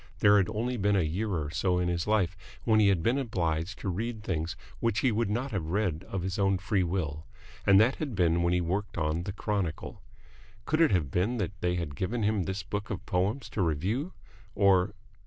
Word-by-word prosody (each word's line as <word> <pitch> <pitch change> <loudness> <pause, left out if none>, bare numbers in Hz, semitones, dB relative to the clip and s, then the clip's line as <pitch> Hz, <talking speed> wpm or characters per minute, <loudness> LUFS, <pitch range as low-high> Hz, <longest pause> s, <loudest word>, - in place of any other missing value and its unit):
There 100 0 +6
had 95 -3 +2
only 120 +3 -2
been 100 -1 +2
a 95 - +3
year 95 +8 -1
or 80 -6 -2
so 90 +4 +1
in 90 0 +1
his 85 0 -1
life 100 -4 +2 0.3
when 110 -2 +4
he 105 - +5
had 95 -4 +2
been 125 +4 +2
obliged 85 - -1
to - - -4
read 110 +4 -3
things 80 -4 -2 0.2
which 115 -1 +1
he 130 - +3
would 110 -1 0
not 125 +6 -2
have 95 -7 -2
read 90 -2 -1
of 95 -2 -3
his 95 0 -3
own 95 -1 +3
free 100 +1 0
will, 80 -4 -2 0.4
and 100 -1 +7
that 115 +5 +4
had 140 -8 -4
been 85 -2 +2
when 85 0 +2
he 90 0 +2
worked 95 +4 -2
on 80 0 0
the 100 - -3
Chronicle. 100 -5 -3 0.6
Could 155 +2 +1
it 165 - +6
have 80 - +1
been 100 - +1
that 95 -6 -1
they 90 0 +1
had 85 -5 -3
given 110 - -2
him 105 -3 +1
this 95 +1 -3
book 105 +4 -4
of 100 - -5
poems 100 +9 0
to 105 - -2
review? 95 - -1 0.4
Or 100 0 +3
95 Hz, 220 wpm, -29 LUFS, 85-105 Hz, 0.6 s, and